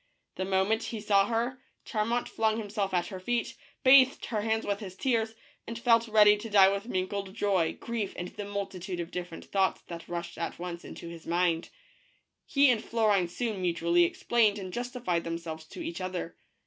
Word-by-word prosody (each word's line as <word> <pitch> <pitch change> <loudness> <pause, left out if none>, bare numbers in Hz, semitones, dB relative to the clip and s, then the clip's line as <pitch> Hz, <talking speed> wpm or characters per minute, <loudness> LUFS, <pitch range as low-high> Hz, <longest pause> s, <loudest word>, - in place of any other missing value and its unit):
The 185 - -3
moment 195 +4 +1
he 225 - -4
saw 200 -1 +3
her, 240 +3 -1 0.2
Charmant 230 +2 -1
flung 220 0 0
himself 205 -2 -2
at 175 -1 +1
her 190 - -6
feet, 235 +5 -1 0.3
bathed 265 0 +6
her 215 -3 -2
hands 220 +1 0
with 200 -1 -1
his 190 -3 -8
tears, 225 -2 0 0.3
and 230 - -5
felt 230 0 +3
ready 210 -1 +6
to 225 +2 -7
die 195 -2 +7
with 200 +3 -3
mingled 195 -1 -3
joy, 190 -7 +1
grief, 230 -4 -3
and 175 0 -5
the 205 - -7
multitude 195 -2 -4
of 170 0 -5
different 175 -2 -6
thoughts 195 -1 0
that 170 -1 -7
rushed 170 0 -5
at 170 - -3
once 175 -1 -6
into - - -9
his 165 -1 -10
mind. 170 -1 +1 0.8
He 280 -2 +5
and 230 - 0
Florine 210 -6 +2
soon 210 +2 -3
mutually 170 0 +3
explained 215 +4 +2
and 185 -2 -6
justified 240 -8 -2
themselves 165 -1 -5
to 340 - -8
each 330 - -5
other. 185 -2 -4
200 Hz, 185 wpm, -29 LUFS, 180-225 Hz, 0.8 s, die